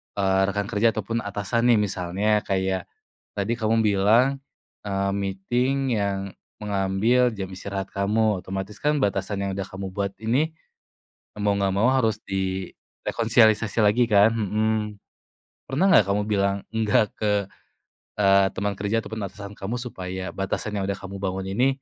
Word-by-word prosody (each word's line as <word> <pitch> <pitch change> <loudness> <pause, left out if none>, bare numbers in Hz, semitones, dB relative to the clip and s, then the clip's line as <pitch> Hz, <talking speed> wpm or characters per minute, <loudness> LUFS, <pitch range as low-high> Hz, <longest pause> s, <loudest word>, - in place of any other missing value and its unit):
eee, 95 -1 +2
rekan 100 +1 -2
kerja, 115 +1 +2
ataupun 115 +2 -2
atasan 105 +4 -1
nih? - - +4
Misalnya, 100 +2 0
kayak 95 -2 -1 0.5
tadi 105 +4 -1
kamu 110 0 +2
bilang, 110 +7 +3 0.5
eee, 100 -1 0
meeting 120 +6 0
yang 100 -1 0 0.4
mengambil 105 +5 +2
jam 95 -2 -5
istirahat 95 +1 -5
kamu, 105 +1 +1
otomatis 95 +2 -5
kan 150 +3 +1
batasan 100 -2 -1
yang - - -2
udah 95 - -2
kamu 95 -1 -6
buat 100 +1 -3
ini, 135 +8 +1 0.9
mau 100 0 +2
nggak 95 -1 +1
mau 110 +5 +3
harus 110 -5 +1
di 95 -1 -3 0.3
rekonsiliasi 115 -1 +3
lagi, 105 +4 +4
kan? 105 0 +5
Mhm. 110 0 0 0.9
Pernah 140 +9 0
nggak 130 - +6
kamu 100 +1 +1
bilang 100 -1 +1
enggak 110 -1 +2
ke, 105 -1 0 0.9
eee, 100 -1 +5
temen 100 +1 -1
kerja, 100 +3 -1
ataupun 110 -1 -6
atasan 100 -1 -9
kamu, 105 +4 -4
supaya 95 -7 -5
batasan 95 +2 -3
yang 95 - -2
udah 100 - -1
kamu 95 0 -8
bangun 95 0 -3
ini 125 +6 +3
100 Hz, 150 wpm, -24 LUFS, 95-110 Hz, 0.9 s, nggak